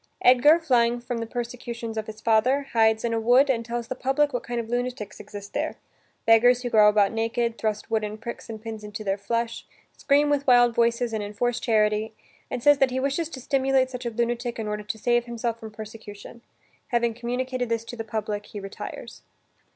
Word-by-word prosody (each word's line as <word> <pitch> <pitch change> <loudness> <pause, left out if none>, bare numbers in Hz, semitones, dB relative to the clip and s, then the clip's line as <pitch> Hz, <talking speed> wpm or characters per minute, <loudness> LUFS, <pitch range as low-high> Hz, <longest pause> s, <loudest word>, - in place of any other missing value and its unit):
Edgar, 255 +6 +7
flying 245 -7 +2
from 240 -1 -4
the 230 - -4
persecutions 235 -1 -5
of 220 -1 -3
his 215 0 -9
father, 235 +6 +3
hides 220 0 +3
in 230 - 0
a 225 - +1
wood 250 +5 +5
and 230 -3 -1
tells 235 0 -4
the - - -3
public 270 +3 +1
what 245 - -1
kind 240 0 -4
of 230 - -4
lunatics 245 -3 -3
exist 205 -1 -9
there - - -2 0.5
beggars 245 +2 +5
who 245 - -3
go 210 -1 +7
about 205 -1 +3
naked, 230 +1 -1
thrust 215 -1 -2
wooden 215 -1 -1
pricks 235 +1 -8
and 220 -1 -7
pins 220 -2 -6
into 210 +1 -7
their 195 -1 0
flesh, 230 +3 -2 0.3
scream 290 +1 +3
with 280 -1 0
wild 245 -1 +6
voices 235 0 +1
and 220 - -1
enforce 230 +4 -1
charity, 215 -1 +1 0.3
and 240 - -4
says 290 -1 +6
that 270 - +4
he 255 +1 -2
wishes 280 +4 -1
to 275 - -8
simulate 265 0 +1
such 250 -1 -5
a - - 0
lunatic 235 +1 -2
in 220 -2 -4
order 210 0 -3
to 210 +2 -5
save 240 +1 +1
himself 235 -1 -3
from 220 - -8
persecution. 215 +1 -10 0.5
Having 235 -2 +1
communicated 245 +1 -3
this 230 0 -1
to 240 - -8
the 225 - -5
public, 215 -2 -4
he 205 - -7
retires. 195 0 -8
235 Hz, 205 wpm, -25 LUFS, 220-245 Hz, 0.5 s, Edgar